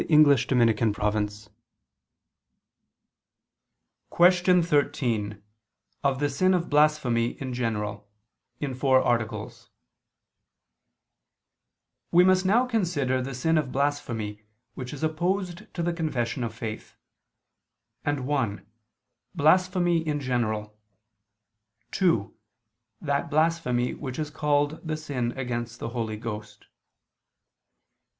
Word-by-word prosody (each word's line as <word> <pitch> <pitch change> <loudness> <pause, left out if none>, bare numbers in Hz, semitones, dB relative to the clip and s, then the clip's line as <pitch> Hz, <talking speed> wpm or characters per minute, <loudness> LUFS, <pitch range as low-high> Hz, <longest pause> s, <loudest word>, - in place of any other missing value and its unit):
_______________________ 110 -7 +3 2.6
QUESTION 180 0 +4
13 125 - 0 0.6
OF 135 -1 +1
THE 145 - +2
SIN 185 +7 +2
OF 175 -1 -1
BLASPHEMY, 145 -6 +3
IN 130 -2 -4
GENERAL 105 -4 -3 0.5
(In 140 -3 -3
Four 130 0 +3
Articles) 115 -2 -2 2.4
We 175 +1 +6
must 185 0 +4
now 235 +6 +4
consider 165 - 0
the 130 0 -5
sin 160 +5 +2
of 140 -4 -3
blasphemy, 120 -7 -2 0.3
which 125 -1 -7
is 145 +1 -7
opposed 175 +3 -2
to 170 - -2
the 175 0 0
confession 135 -7 -2
of 115 -1 -4
faith; 110 -1 -7 1.1
and 145 -3 -1
(1) 130 -9 -1 0.7
blasphemy 175 +2 +3
in 155 -2 -2
general, 110 -5 -2 1.1
(2) 165 - +1 0.7
that 145 +2 -1
blasphemy 155 -6 +1
which 130 -3 -6
is 150 -1 -3
called 145 +1 0
the 155 -2 -3
sin 135 -6 -3
against 120 -2 -4
the - - -5
Holy 115 -3 -3
Ghost. 105 -1 -7
135 Hz, 100 wpm, -26 LUFS, 115-160 Hz, 2.6 s, We